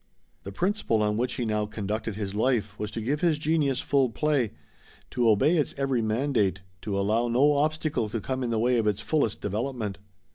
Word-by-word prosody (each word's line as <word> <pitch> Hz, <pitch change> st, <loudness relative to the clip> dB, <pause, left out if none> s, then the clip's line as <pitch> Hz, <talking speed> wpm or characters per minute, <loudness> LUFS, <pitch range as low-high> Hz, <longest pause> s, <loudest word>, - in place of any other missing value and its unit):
The 100 Hz, -, -8 dB
principle 175 Hz, -, 0 dB
on 105 Hz, 0 st, +1 dB
which 125 Hz, +2 st, -1 dB
he 120 Hz, -, -2 dB
now 105 Hz, -1 st, 0 dB
conducted 105 Hz, +1 st, -3 dB
his 100 Hz, -2 st, -4 dB
life 105 Hz, -2 st, 0 dB
was 105 Hz, -, -3 dB
to 115 Hz, -, -5 dB
give 140 Hz, +7 st, -1 dB
his 170 Hz, -4 st, +3 dB
genius 150 Hz, -3 st, +1 dB
full 135 Hz, -3 st, +2 dB
play, 140 Hz, -2 st, +1 dB, 0.6 s
to 120 Hz, -2 st, +2 dB
obey 150 Hz, -, +4 dB
its 150 Hz, -, 0 dB
every 135 Hz, -3 st, 0 dB
mandate, 110 Hz, -5 st, 0 dB, 0.2 s
to 100 Hz, -2 st, -2 dB
allow 110 Hz, +4 st, +1 dB
no 130 Hz, +5 st, +4 dB
obstacle 150 Hz, -5 st, 0 dB
to 115 Hz, +2 st, -2 dB
come 130 Hz, +5 st, -3 dB
in 125 Hz, -, -1 dB
the 115 Hz, -, 0 dB
way 120 Hz, +2 st, +2 dB
of 110 Hz, -, 0 dB
its 105 Hz, -2 st, +1 dB
fullest 145 Hz, -9 st, 0 dB
development. 105 Hz, 0 st, -3 dB
115 Hz, 195 wpm, -27 LUFS, 105-140 Hz, 0.6 s, obey